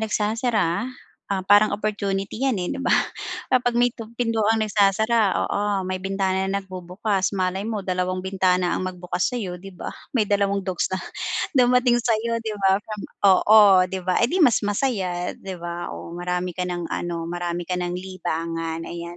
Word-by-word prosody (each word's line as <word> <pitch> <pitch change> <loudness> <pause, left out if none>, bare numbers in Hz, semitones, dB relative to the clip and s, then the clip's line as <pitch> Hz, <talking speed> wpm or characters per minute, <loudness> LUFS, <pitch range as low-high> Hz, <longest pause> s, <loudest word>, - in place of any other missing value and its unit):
nagsasara, 215 -2 0 0.4
ah, 195 -2 -1
parang 205 +1 +5
opportunity 200 -1 -2
'yan, 265 -5 +1
eh, 180 -1 -2
'di 275 - -5
ba? - - +3 0.6
Kapag 245 -2 +3
may 245 +1 +4
tu 225 -1 -9
pintuang 225 -2 +1
nagsasara, 210 0 +2
oo, 205 - -1 0.3
may 185 0 -2
bintana 190 0 0
na 200 0 -1
bubukas, 185 +2 -2
malay 185 +1 0
mo 220 - -2
dalawang 185 0 -1
bintana 185 -2 +1
ang - - -2
magbukas 180 0 -2
sa'yo, 185 -7 -4
'di 195 -1 -11
ba? - - -5 0.3
May 225 - +4
dalawang 200 -1 +1
dogs 185 -2 -1
na 190 - -1 0.6
dumating 250 -1 +4
sa'yo, 230 0 0
'di 220 - -3
ba. 195 0 +3
From 215 -1 -7 0.3
oo, 215 +3 +6 0.3
'di 190 - -3
ba, 185 - +2
eh - - +5
di 370 - +1
mas 245 -6 +5
masaya, 195 -6 -1
'di 190 -1 -7
ba? 175 0 -4
Oh, - - -8
marami 180 +1 -2
ka - - +1
ng 175 -1 -3
ano, 170 -1 -3
marami 175 0 -3
ka 180 - -1
ng 175 0 -2
libangan, 165 -3 -4
ayan. 170 0 -7
195 Hz, 170 wpm, -23 LUFS, 180-215 Hz, 0.6 s, oo